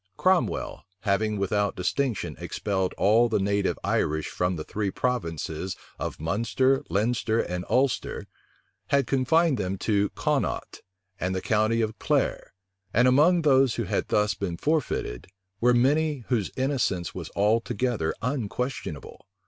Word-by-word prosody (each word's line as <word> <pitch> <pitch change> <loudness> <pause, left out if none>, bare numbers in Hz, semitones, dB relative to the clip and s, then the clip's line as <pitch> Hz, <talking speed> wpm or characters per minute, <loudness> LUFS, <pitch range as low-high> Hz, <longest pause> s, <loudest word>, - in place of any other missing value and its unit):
Cromwell, 185 -1 +1 0.2
having 105 +1 +1
without 100 +1 0
distinction 110 +4 -1
expelled 95 -3 -2
all 115 +4 +4
the 110 - +2
native 100 0 0
Irish 80 +1 0
from 90 0 -1
the 80 - -5
three 105 +3 -2
provinces 90 -7 -2 0.2
of - - -4
Munster, 115 - +1
Leinster, 110 +1 +1
and 90 -3 -2
Ulster, 130 -1 0 0.6
had 140 +3 +2
confined 135 +2 +2
them 95 0 -2
to 100 0 +1
Connaught - - -1 0.4
and 90 +1 -1
the - - 0
county 110 +2 +2
of 110 -1 -2
Clare; - - 0 0.4
and 120 +3 +4
among 160 +7 +4
those 135 -4 +4
who - - -1
had - - -1
thus 105 0 +2
been 95 -3 -4
forfeited, 145 - -1 0.3
were 125 +2 +4
many 140 +2 +2
whose 115 -7 +1
innocence 130 - 0
was - - -6
altogether 110 -3 +1
unquestionable. 125 - -4
110 Hz, 130 wpm, -26 LUFS, 95-130 Hz, 0.6 s, all